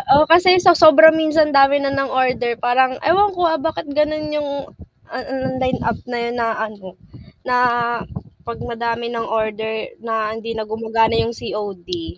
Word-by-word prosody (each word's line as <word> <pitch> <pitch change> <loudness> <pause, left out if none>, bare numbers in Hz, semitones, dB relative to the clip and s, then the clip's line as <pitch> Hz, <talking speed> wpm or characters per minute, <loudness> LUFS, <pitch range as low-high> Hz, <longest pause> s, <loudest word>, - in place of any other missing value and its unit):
Oo, 300 +2 +5
kasi 355 +3 +5
sa 360 -1 +5
sobrang 320 -1 +7
minsan 315 -1 +1
dami 275 0 +5
na 275 0 -1
ng 275 -1 -1
order, 250 -2 -1
parang 255 +2 +1
ewan 390 +7 +3
ko, 355 -1 0
ah, 320 -3 0
bakit 320 +1 -4
ganun 300 +1 -1
yung, 295 -1 -2 0.6
ah - - -5
ah, 260 0 -5
line 255 -1 -1
up 230 - -2
na 240 - -3
yun 235 0 -3
na 230 - 0
ano, 215 -3 -6 0.6
na 250 -1 0 0.9
'pag 235 - -6
madami 235 0 -4
ng 230 -1 -4
order 220 0 -3 0.3
na 225 -2 -3
hindi 225 0 -7
na 220 - -4
gumagana 225 +1 -1
yung 230 - -3
COD. 185 -7 -7
250 Hz, 175 wpm, -19 LUFS, 225-300 Hz, 0.9 s, sobrang